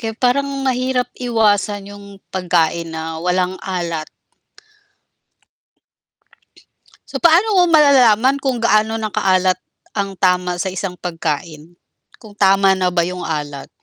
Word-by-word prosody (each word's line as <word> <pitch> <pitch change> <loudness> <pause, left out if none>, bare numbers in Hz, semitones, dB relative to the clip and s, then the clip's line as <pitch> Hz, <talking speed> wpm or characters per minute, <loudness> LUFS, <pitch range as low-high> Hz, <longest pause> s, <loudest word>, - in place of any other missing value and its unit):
Kaya 225 -1 -4
parang 260 +3 +1 0.2
mahirap 255 -1 0
iwasan 205 -4 0
yung 200 - -13 0.3
pagkain 170 -2 0
na 160 0 -5
walang 180 +1 0
alat. 170 -4 -4 3.0
So, - - -5
paano 350 +6 +4
mo - - +6
malalaman 270 -4 +4
kung 265 -2 -1
gaano 220 0 +2
na 215 -2 -4
kaalat 185 -1 +1 0.3
ang 195 -2 -3
tama 180 -1 +1
sa 185 +1 -3
isang 185 -1 -5
pagkain? 165 -1 -5 0.4
Kung 215 -2 -15
tama 195 -1 +3
na 185 -1 0
ba 175 -1 +1
yung 180 +1 -5
alat? 145 -3 -5
190 Hz, 120 wpm, -18 LUFS, 175-225 Hz, 3.0 s, mo